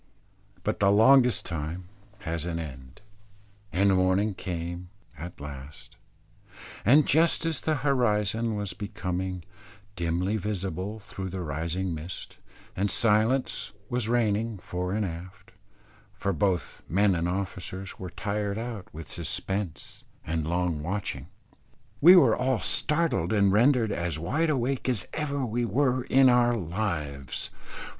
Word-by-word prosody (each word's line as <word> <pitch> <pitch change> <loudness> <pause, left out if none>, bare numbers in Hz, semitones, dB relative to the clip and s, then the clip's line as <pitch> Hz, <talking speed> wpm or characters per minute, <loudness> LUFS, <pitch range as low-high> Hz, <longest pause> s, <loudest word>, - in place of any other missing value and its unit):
But - - -1
the 100 - +4
longest 125 +4 +5
time 85 +2 -4 0.4
has 85 -1 -2
an 85 -1 -2
end, 65 -4 -8 0.7
and 100 +1 +3
morning 95 +3 +2
came 85 -1 -5 0.3
at 85 +4 -8
last, 70 0 -9 0.9
and 140 +7 +6
just 165 +2 +3
as 165 -4 -1
the 155 - +1
horizon 115 -4 +1
was 100 -3 -3
becoming 90 -2 -4 0.5
dimly 90 +4 0
visible 100 0 -3
through 95 -2 -7
the 90 0 -4
rising 85 +4 -2
mist, 80 +3 -7 0.4
and 100 +2 0
silence 115 +5 +1 0.2
was 120 -2 0
reigning 115 -2 +1
fore 90 0 -4
and 105 +1 0
aft 90 +3 -8 0.6
for 100 -1 -2
both 90 +2 -1
men 100 +2 +3
and 85 0 0
officers 95 0 -4
were 90 - -5
tired 105 +1 -2
out 115 -4 -6
with 80 0 -9
suspense 95 -4 -4 0.2
and 80 -1 -2
long 85 -2 0
watching 80 -5 -3 0.7
we 175 +5 +10
were 180 - +6
all 130 -2 +1
startled 150 - +1
and 100 -3 +4
rendered 115 0 +4
as 85 -5 -1
wide 155 - 0
awake 130 -2 0
as 115 -8 0
ever 140 -3 -1
we 120 +1 -1
were 125 +3 +1
in 135 0 +5
our 120 -1 +4
lives. 80 - -3
100 Hz, 130 wpm, -27 LUFS, 85-115 Hz, 0.9 s, we